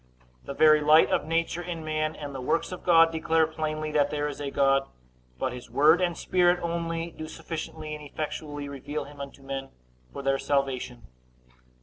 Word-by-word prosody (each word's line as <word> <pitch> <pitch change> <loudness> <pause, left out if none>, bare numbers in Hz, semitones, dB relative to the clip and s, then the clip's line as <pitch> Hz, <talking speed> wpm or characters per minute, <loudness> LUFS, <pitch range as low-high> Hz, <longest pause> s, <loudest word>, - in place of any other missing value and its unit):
The 140 - -6
very 155 0 +6
light 155 +2 +6
of 150 - +1
nature 165 +1 0
in 170 -2 -6
man, 155 0 -1
and 145 -2 -7
the 135 - -5
works 145 +8 0
of 180 - -7
God, 165 -2 +6
declare 160 0 +2
plainly 155 -1 -3
that 145 -1 +2
there 145 0 -1
is 145 0 -6
a 140 - -2
God; 135 0 +2 0.5
but 125 - -2
his 125 -1 -9
word 155 +5 +5
and 175 -2 0
Spirit 180 -1 +3
only 170 0 -2
do 155 0 -8
sufficiently 155 -1 -6
and 150 0 -7
effectually 145 0 -5
reveal 140 +2 -5
him 145 0 -11
unto 140 0 -9
men 135 0 -5 0.4
for 140 - -7
their 135 0 +1
salvation. 135 - -1
155 Hz, 185 wpm, -27 LUFS, 140-165 Hz, 0.5 s, very